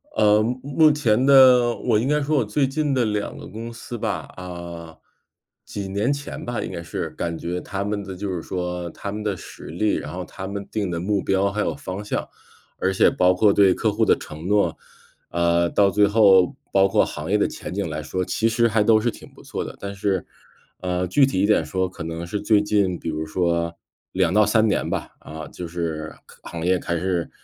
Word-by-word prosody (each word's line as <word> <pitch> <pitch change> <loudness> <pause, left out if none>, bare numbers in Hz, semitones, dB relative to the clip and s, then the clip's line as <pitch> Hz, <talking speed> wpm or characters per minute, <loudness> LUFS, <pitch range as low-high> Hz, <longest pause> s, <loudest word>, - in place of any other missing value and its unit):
呃， 105 0 +5
目 120 +4 -1
目 150 +3 +4
前 125 -5 +2
的 130 -3 +7
我 115 -4 +1
应 120 - -1
该 150 +1 +2
说 145 +1 +1
我 120 - +2
最 135 +6 +1
近 145 0 -1
的 125 -3 +2
2 105 -1 -2
个 - - -9
公 115 +2 -7
司 115 +1 -8
吧， - - -3
啊， 85 -3 -8 0.7
几 100 -2 -5
年 105 +7 0
前 145 0 -5
吧， 120 -4 -3
应 - - -5
该 85 - -5
是， 85 - -4
感 85 -1 -4
觉 90 +1 -4
它 100 0 -4
们 105 0 -2
的 95 -1 -7
就 100 +2 -4
是 85 - -3
说 90 -1 -4
它 100 - -6
们 105 +1 -5
的 100 -4 -1
实 - - -11
力， 100 +7 0
然 75 - -5
后 90 0 -5
它 95 +3 -7
们 100 0 -5
定 105 -4 -1
的 85 - -2
目 100 +2 0
标 95 +1 +1
还 105 +2 -2
有 - - -1
方 100 -8 -6
向， 105 - -3 0.5
而 95 - +1
且 - - +5
包 90 0 +3
括 100 +2 +4
对 100 -2 +5
客 - - 0
户 - - 0
的 - - +5
承 75 +3 -8
诺， 105 +1 +2 0.5
呃， 85 0 +2
到 100 +2 +3
最 105 +1 +4
后 100 -4 +5 0.2
包 95 0 +5
括 - - +3
行 - - -6
业 - - +4
的 - - +2
前 - - -7
景 100 -2 -2
来 75 0 -4
说， 90 +5 -3
其 115 +5 +1
实 115 +1 +3
还 110 -1 +2
都 110 0 +5
是 120 +1 0
挺 - - -13
不 - - -16
错 - - -4
的。 - - -8
但 100 0 -5
是， 100 -2 -1 0.5
呃， 90 0 -1
具 135 +10 +4
体 130 -9 -1
一 - - +4
点 105 +1 +3
说， 95 0 -1
可 90 - -8
能 80 +1 -5
是 100 +4 -4
最 105 -2 +4
近 100 -4 +1
比 85 - -4
如 80 0 -3
说 85 0 -1 0.3
2 90 -2 +1
到 105 +1 +5
3 110 +2 +3
年 - - 0
吧， - - -3
啊， 80 0 -8
就 90 - -7
是 80 -2 -4 0.3
行 85 -1 -6
业 90 0 +3
开 85 - -2
始 90 -1 -1
100 Hz, 235 characters per minute, -23 LUFS, 90-110 Hz, 0.7 s, 的